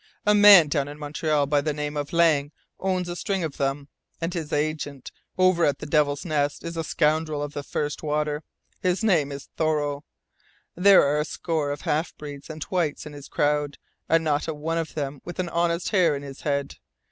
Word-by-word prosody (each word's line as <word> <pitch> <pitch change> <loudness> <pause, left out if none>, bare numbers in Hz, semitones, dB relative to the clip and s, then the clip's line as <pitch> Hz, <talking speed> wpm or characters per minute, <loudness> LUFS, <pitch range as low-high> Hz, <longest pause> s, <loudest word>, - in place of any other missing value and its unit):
A 210 - +5
man 205 -5 +9
down 145 -1 0
in 145 +1 -8
Montreal 150 0 0
by 145 0 +2
the 150 +1 -1
name 150 0 -3
of 145 -1 -3
Lang 160 -4 +3 0.3
owns 185 -2 -1
a 175 - -4
string 190 0 -2
of 155 -3 -4
them, 140 0 -1 0.3
and 165 +1 -3
his 160 -3 -4
agent 145 -3 -2 0.3
over 185 -2 +4
at 140 -3 +2
the - - -8
Devil's 145 0 +1
Nest 145 -3 -1
is 170 0 -5
a 165 - -2
scoundrel 155 -1 0
of 145 0 -6
the 145 - -4
first 145 +1 -3
water. 150 -1 -1 0.4
His 185 +3 0
name 165 -10 +2
is 140 0 -8
Thoreau. 150 -2 0 0.7
There 195 +2 +6
are 145 +1 +1
a - - +1
score 155 -2 -2
of 145 0 -4
half 155 +3 -1
breeds 145 -1 -9
and 155 -1 -5
whites 170 -7 -2
in 150 - -9
his 145 -1 -10
crowd, 145 -1 0 0.3
and 165 0 +4
not 150 -1 0
a 160 - -3
one 165 +3 -2
of 165 - -5
them 140 -2 -4
with 175 - -8
an 180 -2 -2
honest 170 0 0
hair 180 -7 +3
in 140 - -6
his 135 -1 -9
head. 140 -1 -2
150 Hz, 205 wpm, -25 LUFS, 145-170 Hz, 0.7 s, man